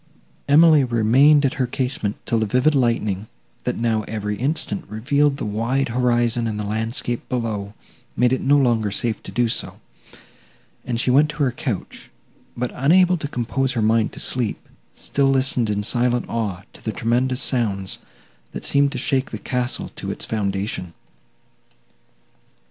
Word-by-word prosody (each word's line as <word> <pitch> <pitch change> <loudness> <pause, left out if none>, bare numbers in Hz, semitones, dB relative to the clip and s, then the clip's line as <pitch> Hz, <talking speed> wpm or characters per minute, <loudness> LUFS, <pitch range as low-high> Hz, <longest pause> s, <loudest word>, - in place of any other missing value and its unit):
Emily 155 0 +6
remained 130 +5 +4
at 135 - +1
her 125 - +1
casement, 125 -5 -2
till 115 - +1
the 110 - 0
vivid 125 +8 +3
lightning, 110 -6 0 0.4
that - - -1
now, 115 -1 +1
every 105 -1 -3
instant, 155 - -2
revealed 140 +6 +1
the 145 - -4
wide 115 +6 -1
horizon 120 -1 +1
and 105 -1 -3
the - - -2
landscape 115 +3 -2
below, 105 -5 -3 0.4
made 125 0 +3
it 130 - 0
no 145 +2 +4
longer 120 -6 +2
safe 110 +2 -1
to - - -9
do 120 -1 +1
so, 115 - -2 1.0
and 120 -2 -2
she 125 - +2
went 145 +4 +4
to 150 0 -2
her 130 - +2
couch; 125 - -5 0.5
but, 125 0 -2
unable 180 +7 +4
to 150 - -4
compose 135 +1 -1
her 115 - -1
mind 110 0 +2
to - - -7
sleep, 120 -5 -1 0.2
still 140 -1 +1
listened 130 -4 +1
in 105 0 -1
silent 120 +2 +1
awe 100 -5 -3
to - - -15
the 110 - -2
tremendous 125 +3 0
sounds, 100 -7 -1 0.5
that - - -6
seemed 140 0 +3
to - - -4
shake 130 +1 0
the 110 - -5
castle 125 +3 -2
to - - -5
its - - -4
foundation. 100 -4 -3
120 Hz, 160 wpm, -21 LUFS, 110-135 Hz, 1.0 s, Emily